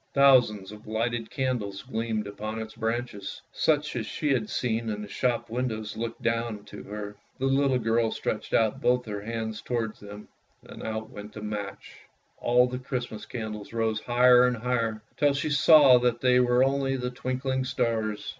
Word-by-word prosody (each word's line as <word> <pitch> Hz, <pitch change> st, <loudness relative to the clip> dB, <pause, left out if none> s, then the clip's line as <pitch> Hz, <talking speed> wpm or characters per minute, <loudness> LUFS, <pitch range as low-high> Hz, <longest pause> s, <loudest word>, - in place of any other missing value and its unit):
Thousands 125 Hz, -8 st, +5 dB
of 105 Hz, 0 st, -12 dB
lighted 115 Hz, +1 st, -2 dB
candles 120 Hz, -7 st, -2 dB
gleamed 115 Hz, -3 st, -2 dB
upon 110 Hz, +2 st, -5 dB
its 110 Hz, 0 st, -6 dB
branches, 115 Hz, -3 st, -3 dB
and -, -, -4 dB
coloured 155 Hz, -2 st, +5 dB
pictures, 150 Hz, -, -8 dB
such -, -, -9 dB
as -, -, -2 dB
she 150 Hz, -3 st, 0 dB
had 110 Hz, -5 st, -1 dB
seen 115 Hz, -2 st, -1 dB
in 105 Hz, -1 st, -3 dB
the -, -, -7 dB
shop 120 Hz, +2 st, -1 dB
windows, 115 Hz, -3 st, -3 dB
looked 115 Hz, +2 st, -5 dB
down 115 Hz, -2 st, -1 dB
to 105 Hz, -, -10 dB
her. 105 Hz, 0 st, -6 dB, 0.2 s
The 135 Hz, -, -2 dB
little 135 Hz, -1 st, +3 dB
girl 115 Hz, -1 st, +1 dB
stretched -, -, -3 dB
out 110 Hz, -2 st, +2 dB
both 125 Hz, 0 st, +2 dB
her 105 Hz, -2 st, -5 dB
hands 110 Hz, 0 st, -4 dB
towards 115 Hz, -3 st, -3 dB
them 105 Hz, 0 st, -10 dB, 0.2 s
— -, -, -40 dB
then -, -, -11 dB
out 110 Hz, 0 st, -4 dB
went 105 Hz, 0 st, -9 dB
the 105 Hz, -, -8 dB
match. 105 Hz, -2 st, -6 dB, 0.4 s
All 125 Hz, +1 st, +4 dB
the 125 Hz, 0 st, -4 dB
Christmas 125 Hz, -4 st, -5 dB
candles 110 Hz, -2 st, -6 dB
rose 110 Hz, -1 st, 0 dB
higher 125 Hz, +1 st, +5 dB
and 125 Hz, -1 st, -1 dB
higher, 115 Hz, -2 st, -1 dB
till 145 Hz, -1 st, +3 dB
she 140 Hz, +2 st, -1 dB
saw 140 Hz, -3 st, +7 dB
that 120 Hz, -1 st, 0 dB
they 125 Hz, -1 st, +4 dB
were 125 Hz, 0 st, +4 dB
only 135 Hz, 0 st, +1 dB
the 125 Hz, -1 st, -3 dB
twinkling 130 Hz, +1 st, -2 dB
stars. 110 Hz, -4 st, -1 dB
115 Hz, 190 wpm, -27 LUFS, 110-125 Hz, 0.4 s, saw